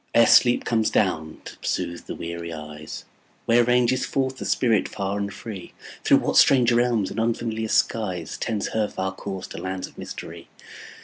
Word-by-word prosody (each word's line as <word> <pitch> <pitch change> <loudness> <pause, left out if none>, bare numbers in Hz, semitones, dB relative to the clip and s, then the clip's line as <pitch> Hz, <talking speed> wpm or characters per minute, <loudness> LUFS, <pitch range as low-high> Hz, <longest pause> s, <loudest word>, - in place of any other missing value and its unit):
Ere 115 0 +7
sleep 120 +2 +5
comes 110 -2 +1
down 80 -6 0
to - - -9
soothe 85 0 -3
the - - -5
weary 85 0 -6
eyes, 75 -1 -8 0.4
Where 120 +1 +5
ranges 125 +1 +2
forth 130 -1 -1
the - - -6
spirit 115 -4 +2
far 100 0 -3
and 100 0 -3
free? 100 -4 -8 0.3
Through - - +6
what - - 0
strange 125 -3 +6
realms 120 -4 +2
and 110 - -4
unfamiliar 115 -1 -1
skies. 95 -7 0
Tends 105 -3 -2
her 110 -1 0
far 95 -1 -3
course 95 -1 -6
to - - -7
lands 95 0 -4
of - - -14
mystery? - - -8
110 Hz, 175 wpm, -24 LUFS, 95-120 Hz, 0.4 s, Ere